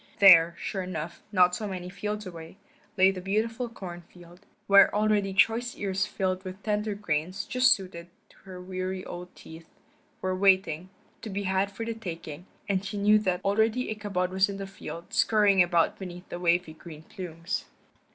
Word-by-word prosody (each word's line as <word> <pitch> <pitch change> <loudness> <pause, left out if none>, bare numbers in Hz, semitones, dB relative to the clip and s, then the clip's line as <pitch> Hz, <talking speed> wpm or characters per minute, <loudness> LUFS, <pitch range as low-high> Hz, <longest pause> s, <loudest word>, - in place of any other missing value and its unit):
There, 170 -4 +8
sure 195 - -4
enough, 175 -3 -6
not 180 -1 +3
many 190 -4 -5
fields 210 +3 -4
away, 165 -1 -10 0.4
lay 190 +1 +6
the 185 -1 -7
beautiful 225 +5 -1
corn 180 -6 -8
field, 175 +2 -18 0.2
where 200 0 +7
already 210 -2 +2
choice 225 +5 +2
ears 195 -1 -1
filled 185 -2 -2
with 185 +1 -9
tender 210 -1 -1
grains, 180 -1 -2
just 255 +1 +3
suited 180 -5 -1 0.2
to - - -23
her 185 -2 -11
worn 185 0 -4
old 180 +1 -8
teeth, 160 0 -13 0.5
were 185 0 -1
waiting, 185 -3 +2 0.3
to 225 - -7
be 200 0 -3
had 190 +1 +1
for 200 +3 -6
the 230 - -2
taking, 170 -5 -8 0.2
and 195 -2 0
she 200 +1 -5
knew 210 +1 +5
that 185 -3 -1
already 220 +4 +1
Ichabod 200 -4 -2
was 190 +1 +2
in 200 - -5
the 195 - -5
field, 180 -3 -9
scurrying 205 -3 +4
about 175 -2 +2
beneath 180 -1 -8
the 175 - -6
wavy 175 -2 +1
green 155 -1 -12
plumes. 165 -3 -5
190 Hz, 170 wpm, -27 LUFS, 180-205 Hz, 0.5 s, There